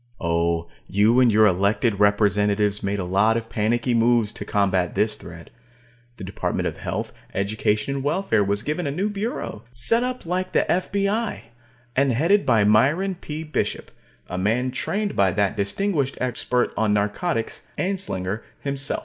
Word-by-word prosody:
Oh, 85 Hz, 0 st, 0 dB, 0.2 s
you 105 Hz, +5 st, +3 dB
and 125 Hz, -2 st, +5 dB
your 110 Hz, +1 st, +5 dB
elected 100 Hz, +3 st, +2 dB
representatives 105 Hz, 0 st, +2 dB
made 100 Hz, +1 st, -1 dB
a 95 Hz, -, -2 dB
lot 100 Hz, +5 st, +3 dB
of 115 Hz, 0 st, -5 dB
panicky 115 Hz, +3 st, 0 dB
moves 115 Hz, -2 st, +3 dB
to -, -, -6 dB
combat 95 Hz, -3 st, +1 dB
this 105 Hz, 0 st, +2 dB
threat. 85 Hz, -4 st, -11 dB, 0.7 s
The -, -, -8 dB
Department 95 Hz, +1 st, -2 dB
of -, -, -5 dB
Health, -, -, -4 dB, 0.2 s
Education, 105 Hz, +4 st, 0 dB
and 135 Hz, -, -4 dB
Welfare 145 Hz, -, +1 dB
was 100 Hz, +2 st, -1 dB
given 150 Hz, +2 st, -2 dB
a -, -, 0 dB
new 190 Hz, +9 st, -1 dB
Bureau, 205 Hz, -, -4 dB
set 125 Hz, -, +2 dB
up 250 Hz, -3 st, -3 dB
like 185 Hz, +2 st, -2 dB
the -, -, +2 dB
F.B.I., 200 Hz, +4 st, -1 dB, 0.5 s
and 135 Hz, -1 st, +3 dB
headed 170 Hz, -, +2 dB
by 115 Hz, -4 st, +4 dB
Myron 140 Hz, -, +3 dB
P. 160 Hz, -3 st, -6 dB
Bishop, 155 Hz, -1 st, -3 dB, 0.4 s
a 90 Hz, -, -4 dB
man 120 Hz, +6 st, +1 dB
trained 205 Hz, +10 st, -2 dB
by 100 Hz, -1 st, +4 dB
that 100 Hz, -1 st, +1 dB
distinguished 140 Hz, -, -1 dB
expert 125 Hz, 0 st, -1 dB
on 105 Hz, -2 st, +2 dB
narcotics, 110 Hz, -, -2 dB
Anslinger, 115 Hz, -, -2 dB, 0.2 s
himself. 140 Hz, 0 st, -2 dB
115 Hz, 160 wpm, -23 LUFS, 100-155 Hz, 0.7 s, and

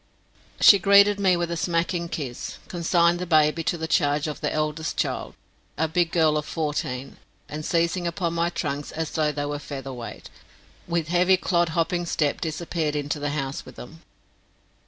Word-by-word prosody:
She 200 Hz, -, +8 dB
greeted 200 Hz, +2 st, +5 dB
me 185 Hz, -3 st, +3 dB
with 170 Hz, 0 st, -2 dB
a -, -, -1 dB
smacking 170 Hz, 0 st, -1 dB
kiss, 130 Hz, -8 st, -5 dB
consigned 170 Hz, 0 st, +2 dB
the 180 Hz, -, -4 dB
baby 155 Hz, 0 st, +3 dB
to 175 Hz, -, 0 dB
the 160 Hz, 0 st, -4 dB
charge 150 Hz, -3 st, +2 dB
of 150 Hz, -2 st, -5 dB
the -, -, -1 dB
eldest 155 Hz, +1 st, -2 dB
child, -, -, -2 dB, 0.4 s
a 160 Hz, -, +1 dB
big 170 Hz, +1 st, +1 dB
girl 155 Hz, -3 st, +3 dB
of 150 Hz, -, -2 dB
fourteen, 140 Hz, -4 st, -3 dB, 0.3 s
and 155 Hz, +1 st, -6 dB
seizing 170 Hz, +2 st, 0 dB
upon 170 Hz, 0 st, -2 dB
my 170 Hz, 0 st, +1 dB
trunks 145 Hz, -4 st, -4 dB
as 160 Hz, -1 st, -4 dB
though 155 Hz, -2 st, +1 dB
they 145 Hz, 0 st, -3 dB
were 145 Hz, 0 st, -3 dB
feather 135 Hz, -2 st, -7 dB
weight, 120 Hz, -2 st, -9 dB, 0.6 s
with 170 Hz, -2 st, -1 dB
heavy 180 Hz, +2 st, +4 dB
clodhopping 175 Hz, -1 st, 0 dB
step 150 Hz, -3 st, 0 dB
disappeared 160 Hz, -1 st, -2 dB
into 145 Hz, 0 st, -2 dB
the 145 Hz, 0 st, -2 dB
house 140 Hz, -2 st, -3 dB
with -, -, -13 dB
them. 160 Hz, +6 st, -11 dB
160 Hz, 175 wpm, -25 LUFS, 150-175 Hz, 0.6 s, She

